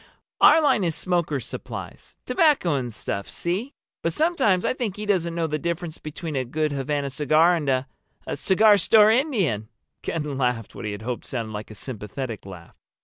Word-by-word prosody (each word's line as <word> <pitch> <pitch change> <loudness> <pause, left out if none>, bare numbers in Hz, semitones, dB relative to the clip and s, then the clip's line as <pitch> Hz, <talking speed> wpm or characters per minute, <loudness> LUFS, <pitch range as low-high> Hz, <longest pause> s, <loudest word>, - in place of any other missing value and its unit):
"Our 315 +1 +7
line 235 -8 +3
is 165 -3 0
smokers' 170 -8 -1
supplies—tobacco 295 - -1
and 125 -4 -2
stuff, 100 -2 -4
see? 200 - -3 0.3
But 165 - -1
sometimes 265 - +2
I - - +2
think 235 -7 -3
he 210 - -5
doesn't 175 -5 0
know 170 -1 0
the 155 -1 -2
difference 170 0 -3
between 155 0 -6
a 130 - 0
good 155 +5 -1
Havana 140 0 -2
cigar 155 +5 +4
and 150 -4 -2
a—a 130 0 -4
cigar 205 +2 +5
store 215 +1 +6
Indian." 200 - +1 0.3
Ken 150 -4 -3
laughed 125 -4 -1
what - - -7
he 105 -1 -3
hoped 120 +3 -5
sounded 115 -4 -4
like 105 0 -6
a 110 - -10
sympathetic 110 -1 -6
laugh. 90 -3 -11
155 Hz, 170 wpm, -24 LUFS, 130-190 Hz, 0.3 s, Our